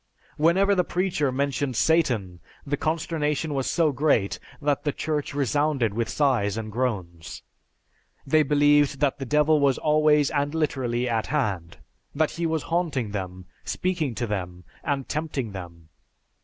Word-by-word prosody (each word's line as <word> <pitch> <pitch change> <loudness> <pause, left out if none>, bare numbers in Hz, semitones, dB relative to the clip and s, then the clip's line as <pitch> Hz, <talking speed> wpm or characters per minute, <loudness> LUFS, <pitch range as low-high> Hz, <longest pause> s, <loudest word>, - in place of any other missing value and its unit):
Whenever 185 +6 +3
the 180 -2 +2
preacher 175 -7 0
mentioned 140 0 -1
Satan, 120 - +1 0.3
the 145 0 -1
consternation 155 -1 -1
was 135 -2 -1
so 165 -3 +2
great 125 -9 +1 0.2
that 145 -2 0
the 145 - 0
church 150 -1 -3
resounded 140 -4 +1
with 115 +1 -2
sighs 120 -8 +1
and 110 -1 -5
groans. 85 - -3 0.8
They 155 +3 +4
believed 145 -1 +3
that 145 -3 +1
the 135 - -5
Devil 150 +2 +3
was 140 -2 +3
always 150 -1 +3
and 145 0 -1
literally 125 -6 -1
at 115 -2 -1
hand; 100 - -2 0.4
that 155 +1 +1
he 170 0 -2
was 160 -1 -1
haunting 160 -10 -1
them, 95 -2 -5 0.2
speaking 170 -9 -2
to 120 - -2
them, 90 -4 -4 0.2
and 140 -3 -2
tempting 145 -7 -3
them. 85 -4 -10
140 Hz, 145 wpm, -25 LUFS, 115-155 Hz, 0.8 s, They